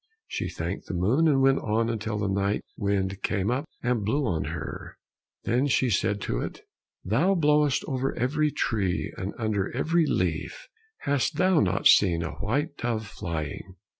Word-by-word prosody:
She - - -3
thanked - - -5
the 95 - -4
moon, 115 - +3
and 135 -3 +3
went 135 0 +4
on 115 +2 0
until 110 -2 -2
the 105 -1 -1
night 100 +1 0
wind 100 -2 -1
came 100 +2 0
up 135 +4 -1 0.2
and 120 -3 +1
blew 135 +8 +1
on 85 -8 -1
her, - - -6 0.5
then 125 +4 +1
she 130 -2 +2
said 100 +1 +1
to - - -2
it, - - -5 0.4
"Thou 145 - +2
blowest 150 -4 +3
over 135 -1 -1
every 150 +5 +1
tree 100 -9 -1
and 95 +2 -5
under 105 -4 -1
every 165 +3 +2
leaf, - - -2 0.3
hast 145 +2 0
thou 185 0 +3
not 95 -1 +1
seen 85 -4 +5
a 80 - -3
white 140 - -1
dove 115 -2 -2
flying?" 85 0 -5
115 Hz, 165 wpm, -27 LUFS, 100-140 Hz, 0.5 s, seen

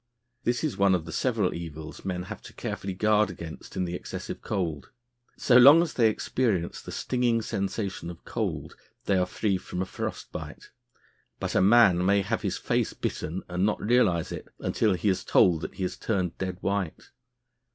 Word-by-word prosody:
This 120 +4 0
is 155 - -1
one 100 -1 +5
of 85 -3 -3
the 80 - -7
several 110 -2 0
evils 80 -2 -8
men 90 -2 -3
have - - -8
to - - -12
carefully 95 -1 -4
guard 105 +1 +3
against 85 -3 -9
in 90 - 0
the 85 - -4
excessive 90 - -6
cold. 85 -8 -3 0.5
So 125 - +5
long 140 +7 +9
as 170 - -4
they 115 -3 +4
experience 105 -5 -1
the - - -9
stinging 120 -3 0
sensation 100 -4 -3
of 85 -1 -11
cold, - - -3 0.3
they 100 - +2
are 90 -1 +2
free 100 +1 0
from 90 -1 -6
a 95 - 0
frost - - -5
bite; - - -8 0.7
but - - -3
a - - +3
man 100 -3 +6
may 100 +1 +3
have - - -1
his - - -2
face - - 0
bitten 85 +4 -4
and 90 +1 -1
not 105 +1 +1
realise 105 -7 +2
it - - -6
until 105 -4 +1
he 90 - -2
is 95 -2 +1
told 85 -3 +4
that - - -6
he 95 - -4
has 90 - -3
turned 95 -6 -1
dead 95 -1 -3
white. 100 -4 -2
95 Hz, 190 wpm, -27 LUFS, 90-110 Hz, 0.7 s, long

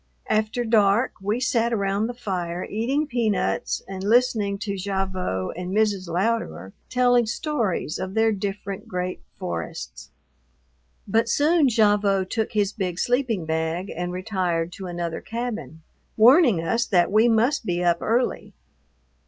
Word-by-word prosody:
After 220 +3 0
dark 220 +1 +3
we 205 +4 -1
sat 235 -2 +1
around 200 0 0
the 245 - -6
fire 180 -6 -3
eating 260 +8 -1
peanuts 215 - -1
and 190 -1 -6
listening 215 -2 +2
to 200 0 -4
Gavotte 190 - -2
and 180 +1 -5
Mrs. 205 -4 +1
Louderer 170 - -1 0.2
telling 245 -2 +3
stories 225 - -2
of 190 +2 -5
their 225 0 +3
different 200 -1 -4
great 180 0 -4 0.2
forests. 65 -8 -6 1.0
But 225 +3 +2
soon 305 +3 +3
Gavotte 205 -4 +2
took 220 -2 -1
his 205 -1 +1
big 180 -4 -3
sleeping 240 -6 0
bag 160 +4 -2
and 175 +1 -3
retired 180 -3 -2
to 190 +1 -8
another 170 -2 -4
cabin, 215 - -5 0.3
warning 240 - +6
us 230 +7 +1
that 180 -2 +3
we 215 +3 +5
must 235 +6 +2
be 175 -4 -1
up 170 -1 +2
early. 240 +3 -1
200 Hz, 135 wpm, -24 LUFS, 180-230 Hz, 1.0 s, warning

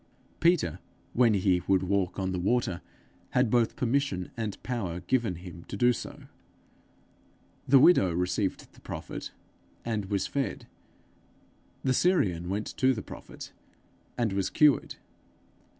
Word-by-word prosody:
Peter, 170 0 +2 0.3
when 115 -3 +4
he 95 -2 +2
would 95 -1 +3
walk 95 -1 0
on 95 -1 -1
the 90 - -2
water, 95 -2 0 0.6
had 125 -3 +3
both 120 -2 +2
permission 125 -8 -1
and 110 -4 -3
power 95 -9 -3
given 115 0 0
him 85 0 -10
to 100 - -6
do 120 +3 +4
so. - - -8 1.4
The 135 - +7
widow 130 - +6
received 90 +3 -2
the - - -19
prophet, - - -6 0.6
and 110 -3 -1
was 100 0 -1
fed; 140 -1 -3 1.2
the 130 - +2
Syrian 95 - +2
went 105 +3 -2
to 130 0 +3
the 110 - -5
prophet, - - -10 0.7
and 115 -5 0
was 95 -1 0
cured. 150 -2 +3
105 Hz, 135 wpm, -28 LUFS, 90-125 Hz, 1.4 s, The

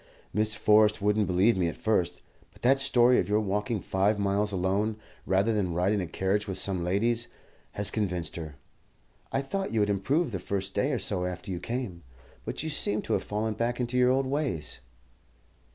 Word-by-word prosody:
Miss 110 0 +2
Forrest 105 0 +4
wouldn't 105 0 +1
believe 95 +6 +3
me 90 -2 +1
at 85 - -3
first; 90 -5 0 0.3
but - - -22
that 135 +3 +4
story 125 -2 +4
of 90 - -1
your 105 +1 +3
walking 105 +1 -1
five 100 +3 +1
miles 100 +1 +1
alone, 100 +3 0 0.3
rather 100 +4 +2
than 95 -5 -1
ride 90 +4 +2
in 105 - 0
a 90 - -4
carriage 95 +5 -1
with 95 -1 -2
some 95 -2 0
ladies, 115 +6 +1 0.5
has 100 -1 +1
convinced 90 -7 -2
her. 80 -4 -6 0.8
I 135 - 0
thought 195 +8 -3
you 115 - 0
had 105 0 +2
improved 135 - 0
the 95 - -3
first 95 +1 -3
day 140 - +1
or 130 - 0
so 95 -3 -1
after 90 +1 -6
you 90 - -3
came, 110 -3 -4 0.4
but - - -3
you 160 - -3
seem 105 -7 0
to - - -2
have - - 0
fallen 105 +1 -2
back 120 +3 -2
into 125 0 -2
your 125 0 +4
old 135 +1 +2
ways." 130 - -2
105 Hz, 200 wpm, -28 LUFS, 95-115 Hz, 0.8 s, Forrest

